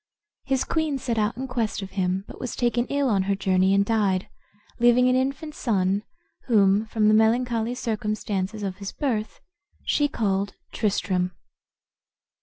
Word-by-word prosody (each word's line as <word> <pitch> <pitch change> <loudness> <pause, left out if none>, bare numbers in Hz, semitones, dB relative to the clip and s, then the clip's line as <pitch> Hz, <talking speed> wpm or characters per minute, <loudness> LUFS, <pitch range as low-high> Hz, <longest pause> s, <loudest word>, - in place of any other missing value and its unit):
His 265 -1 +1
queen 315 -3 -1
set 235 -3 -2
out 210 +2 0
in 265 +1 -4
quest 230 -5 -2
of 195 - -8
him, 190 0 -1
but - - -11
was 250 - -4
taken 240 0 +1
ill 280 -1 0
on 205 -5 +2
her 200 - +3
journey, 190 -1 +2
and 200 0 +3
died, 200 -4 +1 0.5
leaving 240 +1 +5
an 255 - +3
infant 275 +4 -1
son, 200 - 0 0.5
whom, 205 -2 +4
from 215 -1 +1
the 215 - +5
melancholy 230 +1 +2
circumstances 215 -3 -2
of 190 -2 -3
his 200 0 -6
birth, 230 -7 -2 0.4
she 290 - +2
called 200 -6 -1 0.2
Tristram. 185 -3 0
220 Hz, 155 wpm, -25 LUFS, 195-250 Hz, 0.5 s, leaving